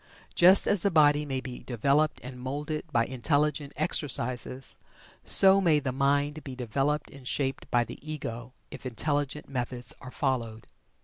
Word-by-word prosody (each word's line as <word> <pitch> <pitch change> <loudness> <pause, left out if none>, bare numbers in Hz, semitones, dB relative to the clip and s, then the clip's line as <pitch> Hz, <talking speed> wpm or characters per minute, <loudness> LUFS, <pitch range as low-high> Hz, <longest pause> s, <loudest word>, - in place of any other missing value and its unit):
Just 185 +3 +6
as 205 -3 +3
the 200 - +2
body 150 -3 +4
may 135 -2 -2
be 125 -2 -8
developed 140 +6 +1
and 125 0 -8
moulded 145 +4 -4
by 115 -4 +2
intelligent 145 +3 0
exercises, 130 -4 0 0.5
so 195 0 +6
may 165 -5 +4
the 135 -2 -3
mind 145 +3 0
be 135 -2 -7
developed 135 +5 -2
and 135 -2 -12
shaped 135 -1 -2
by 120 -1 +3
the - - -10
Ego 130 -6 -6 0.2
if - - -9
intelligent 145 +3 -2
methods 125 -2 -3
are 130 - -9
followed. 120 -5 -2
140 Hz, 150 wpm, -28 LUFS, 125-150 Hz, 0.5 s, Just